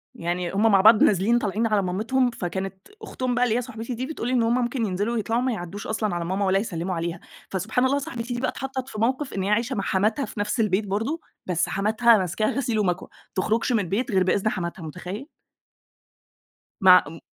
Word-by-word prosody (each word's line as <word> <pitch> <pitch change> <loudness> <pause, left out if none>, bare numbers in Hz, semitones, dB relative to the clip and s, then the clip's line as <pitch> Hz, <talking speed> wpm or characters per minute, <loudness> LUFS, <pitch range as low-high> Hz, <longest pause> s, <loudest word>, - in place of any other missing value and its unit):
يعني 175 -3 -2
هم 215 +3 +3
مع 195 -1 +5
بعض 215 +1 +7
نازلين 215 +4 +3
طالعين 215 +1 0
على 210 -2 +2
مامتهم، 225 +8 +1
فكانت 190 -1 -5
أختهم 255 -1 -3
بقى 245 - +2
اللي 235 -2 +2
هي - - 0
صاحبتي 230 0 -6
دي 255 +3 -3
بتقول 275 -5 -5
لي: 255 - 0
"إن 245 -2 +3
هم 230 +2 +2
ممكن 240 -1 -1
ينزلوا 205 +4 -1
ويطلعوا 230 +1 0
ما 255 0 0
يعدّوش 195 0 -6
أصلًا 215 -3 -1
على 170 -1 -2
ماما 190 +3 -1
ولا 190 0 +3
يسلِّموا 185 -3 -3
عليها." 170 +1 -3 0.3
فسبحان 215 +7 0
الله 275 +2 +2
صاحبتي 245 -3 -5
دي 240 - -3
بقى 260 - +1
اتحطّت 265 -1 -5
في 215 - -7
موقف 260 +4 0
إن 190 - -2
هي 195 - -1
عايشة 230 +5 +1
مع 195 - -2
حماتها 215 +9 +1
في - - -9
نَفْس 205 +4 -1
البيت 205 -1 +1
برضه، 225 +12 -2 0.2
بس 175 -2 0
حماتها 220 +3 +4
ماسكاها 190 +3 0
غسيل 240 -4 -1
ومكوة، 180 -3 -1 0.3
تخرُجش 220 +6 +1
من 235 - +3
البيت 205 +7 -1
غير 190 -2 +3
بإذن 195 +3 +1
حماتها، 170 -3 -4
مُتخيّل؟ 180 - -7 1.5
مع 185 -1 +8
ام 165 +2 -9
215 Hz, 210 wpm, -24 LUFS, 190-240 Hz, 1.5 s, مع